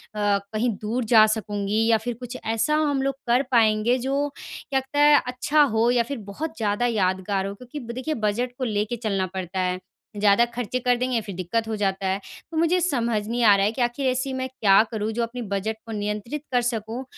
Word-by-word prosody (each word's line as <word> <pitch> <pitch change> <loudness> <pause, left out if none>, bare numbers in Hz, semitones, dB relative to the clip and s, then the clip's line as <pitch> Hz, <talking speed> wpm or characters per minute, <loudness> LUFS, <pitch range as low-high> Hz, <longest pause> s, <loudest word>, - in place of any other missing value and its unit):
कहीं 205 +3 0
दूर 230 +4 -1
जा 215 -1 +9
सकूँगी 210 0 -1
या 230 -1 +5
फ़िर 240 +3 -4
कुछ 250 0 -7
ऐसा 225 +7 +1
हम 290 -3 +1
लोग 275 0 -1
कर 245 +3 +3
पाएँगे 225 0 +3
जो 275 +3 0
क्या 270 - -4
कहते 265 +2 -4
हैं 295 0 +6
अच्छा 265 +4 +2
हो 225 +2 +3
या 245 -1 +3
फ़िर 275 +4 -5
बहुत 315 +10 -5
ज़्यादा 210 +2 0
यादगार 195 -3 0
हो। 200 - -5
क्योंकि 250 +7 -9
ब 235 -3 -7
देखिए, 260 +6 -3
बजट 230 +1 -1
को 265 - -3
लेके 215 -1 -1
चलना 205 -5 -1
पड़ता 190 0 -4
है, 180 0 0 0.4
ज़्यादा 205 +3 +4
खर्चे 245 +1 -2
कर 250 0 +2
देंगे 250 -1 0
फ़िर 205 -3 -8
दिक्कत 195 +6 -2
हो 220 - -2
जाता 195 -2 -1
है। 190 +1 0 0.3
तो 320 - -4
मुझे 335 +3 +3
समझ 235 -10 0
नहीं 240 +1 -1
आ 205 -3 +7
रहा 195 0 +2
है 210 - +1
कि 250 - -4
आखिर 240 +3 0
ऐसी 255 +1 -1
मैं 260 0 -2
क्या 210 -7 +4
करूँ 220 -1 -2
जो 235 +2 -1
अपने 240 +2 -5
बजट 210 0 -3
को 225 - -8
नियंत्रित 210 +7 -3
कर 245 -1 +3
सकूँ 235 +1 -3
230 Hz, 215 wpm, -24 LUFS, 205-255 Hz, 0.4 s, जा